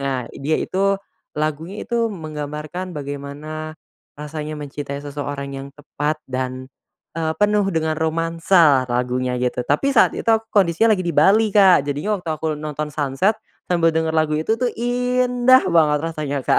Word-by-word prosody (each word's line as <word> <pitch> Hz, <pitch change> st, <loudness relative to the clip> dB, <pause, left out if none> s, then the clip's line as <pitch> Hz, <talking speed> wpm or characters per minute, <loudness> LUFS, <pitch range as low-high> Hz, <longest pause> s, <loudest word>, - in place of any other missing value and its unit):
Nah 135 Hz, -3 st, -2 dB
dia 150 Hz, +3 st, -1 dB
itu 195 Hz, +1 st, +1 dB, 0.4 s
lagunya 155 Hz, +6 st, -3 dB
itu 235 Hz, -1 st, 0 dB
menggambarkan 155 Hz, +1 st, -6 dB
bagaimana, 145 Hz, +2 st, -6 dB, 0.4 s
rasanya 150 Hz, +1 st, -6 dB
mencintai 145 Hz, -1 st, -6 dB
seseorang 145 Hz, -1 st, -5 dB
yang 135 Hz, 0 st, -6 dB
tepat 150 Hz, +1 st, -3 dB
dan, 130 Hz, 0 st, -3 dB, 0.5 s
eee, 160 Hz, -1 st, 0 dB
penuh 205 Hz, -1 st, +3 dB
dengan 160 Hz, -1 st, 0 dB
romansa 165 Hz, -3 st, +3 dB
lagunya 125 Hz, +1 st, -1 dB
gitu, 125 Hz, 0 st, -1 dB
tapi 150 Hz, -, +1 dB
saat -, -, +5 dB
itu 230 Hz, -, 0 dB, 0.2 s
kondisinya 205 Hz, +3 st, +4 dB
lagi 185 Hz, -, -3 dB
di -, -, +1 dB
Bali 210 Hz, +8 st, +4 dB
Kak 190 Hz, -7 st, +6 dB
jadinya 145 Hz, +10 st, -1 dB
waktu 170 Hz, -2 st, -5 dB
aku 155 Hz, 0 st, -2 dB
nonton 150 Hz, 0 st, -4 dB
sunset, 145 Hz, +8 st, +1 dB, 0.4 s
sambil 165 Hz, -2 st, +3 dB
denger 160 Hz, 0 st, 0 dB
lagu 155 Hz, -1 st, +2 dB
itu 190 Hz, +8 st, +1 dB
tuh 250 Hz, -1 st, 0 dB
indah 250 Hz, +1 st, +3 dB
banget 155 Hz, -3 st, +4 dB
rasanya 150 Hz, -3 st, -3 dB
Kak. -, -, +4 dB
155 Hz, 150 wpm, -21 LUFS, 145-185 Hz, 0.5 s, Kak